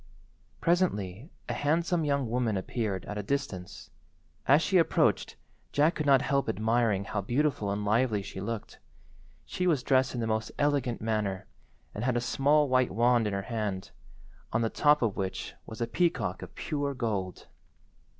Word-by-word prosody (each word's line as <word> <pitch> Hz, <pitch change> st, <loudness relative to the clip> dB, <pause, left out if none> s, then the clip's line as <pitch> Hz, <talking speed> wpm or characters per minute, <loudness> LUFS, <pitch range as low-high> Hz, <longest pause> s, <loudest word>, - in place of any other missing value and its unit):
Presently 135 Hz, -, 0 dB, 0.2 s
a -, -, -2 dB
handsome 165 Hz, +3 st, +1 dB
young 140 Hz, -3 st, 0 dB
woman 115 Hz, -3 st, 0 dB
appeared 95 Hz, -1 st, -3 dB
at 105 Hz, -, -5 dB
a -, -, -1 dB
distance. 105 Hz, -7 st, -4 dB, 0.6 s
As 145 Hz, +4 st, +6 dB
she 190 Hz, -2 st, +3 dB
approached 165 Hz, -, +2 dB, 0.4 s
Jack 150 Hz, +4 st, +3 dB
could 155 Hz, -, -3 dB
not 135 Hz, -1 st, +5 dB
help 140 Hz, -4 st, +1 dB
admiring 110 Hz, -1 st, +1 dB
how 100 Hz, 0 st, -3 dB
beautiful 120 Hz, 0 st, 0 dB
and 100 Hz, +1 st, -2 dB
lively 110 Hz, -1 st, +2 dB
she 95 Hz, -1 st, -7 dB
looked. 115 Hz, +1 st, -5 dB, 0.7 s
She 180 Hz, -, -2 dB
was 150 Hz, -7 st, +2 dB
dressed 130 Hz, -1 st, +2 dB
in -, -, -2 dB
the 115 Hz, -, -1 dB
most 110 Hz, 0 st, -1 dB
elegant 145 Hz, -5 st, 0 dB
manner, 105 Hz, -3 st, -1 dB, 0.5 s
and 105 Hz, -, -4 dB
had 125 Hz, -1 st, +1 dB
a -, -, +3 dB
small 145 Hz, +4 st, +2 dB
white 130 Hz, -1 st, +3 dB
wand 120 Hz, +1 st, +3 dB
in 105 Hz, -, -2 dB
her 100 Hz, 0 st, -2 dB
hand, 105 Hz, -5 st, -3 dB, 0.6 s
on 110 Hz, +1 st, +1 dB
the 115 Hz, -, 0 dB
top 150 Hz, -2 st, +4 dB
of 110 Hz, -4 st, 0 dB
which 95 Hz, -1 st, -3 dB
was 110 Hz, +2 st, -8 dB
a -, -, +2 dB
peacock 170 Hz, +7 st, 0 dB
of -, -, -10 dB
pure 145 Hz, -3 st, -2 dB
gold. 105 Hz, -7 st, -3 dB
120 Hz, 170 wpm, -29 LUFS, 105-140 Hz, 0.7 s, As